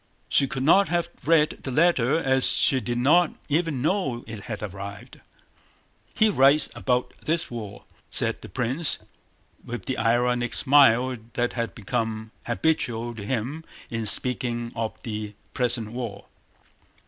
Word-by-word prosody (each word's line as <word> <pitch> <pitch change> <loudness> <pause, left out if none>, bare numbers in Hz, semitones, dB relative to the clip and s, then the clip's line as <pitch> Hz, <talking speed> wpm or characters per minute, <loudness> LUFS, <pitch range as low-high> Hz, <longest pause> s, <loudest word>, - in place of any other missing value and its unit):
She 135 - +3
could 130 -1 -3
not 195 +7 +5
have 170 0 0 0.2
read 155 -1 +3
the - - -5
letter 150 -2 +3
as 130 -5 +2
she 135 - +3
did 120 +2 -2
not 155 +7 +4
even 150 -4 0
know 150 -9 0
it 110 -3 -8
had 110 -3 -5
arrived. 100 0 -8 0.9
"He 220 - +4
writes 140 -5 +4
about 125 -1 -1
this 160 -2 -1
war," 105 -4 -7 0.3
said - - +1
the - - -10
prince, 130 +5 -1 0.7
with 120 0 -6
the 130 - -2
ironic 120 +1 +1
smile 130 -2 +4 0.2
that 120 0 -1
had 115 -2 -3
become 110 0 -3 0.2
habitual 120 -3 0
to 110 -3 -8
him 130 +8 -3 0.3
in 115 -2 -2
speaking 120 +1 0
of 115 -1 -2
the 105 -2 -5 0.2
present 120 -3 0
war. 115 -5 -6
125 Hz, 140 wpm, -25 LUFS, 115-145 Hz, 0.9 s, not